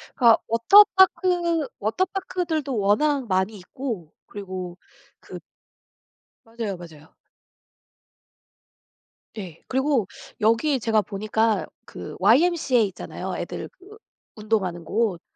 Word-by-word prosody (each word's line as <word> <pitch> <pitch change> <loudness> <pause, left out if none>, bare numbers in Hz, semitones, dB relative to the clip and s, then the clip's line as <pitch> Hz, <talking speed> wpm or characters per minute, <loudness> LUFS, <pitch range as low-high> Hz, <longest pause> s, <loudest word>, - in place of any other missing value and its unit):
그러니까 235 -3 +5
워터파크, 350 - +4
워터파크들도 330 - -2
워낙 250 +7 +1
많이 190 +2 0
있고 195 - -6
그리고 185 -3 -7 0.4
그 - - -10 1.1
맞아요, 225 -4 -5
맞아요. 160 -2 -14 2.2
예. 180 -6 -8
그리고 265 -5 +1 0.3
여기에 240 +6 +2
제가 220 -1 +2
보니까 215 +2 -1 0.2
그 - - -9
YMCA 300 -8 +3
있잖아요 185 - -7
애들 - - -6
그 405 +4 -17 0.4
운동하는 210 -6 -2
곳. 210 -3 -1
225 Hz, 230 characters per minute, -24 LUFS, 195-300 Hz, 2.2 s, 그러니까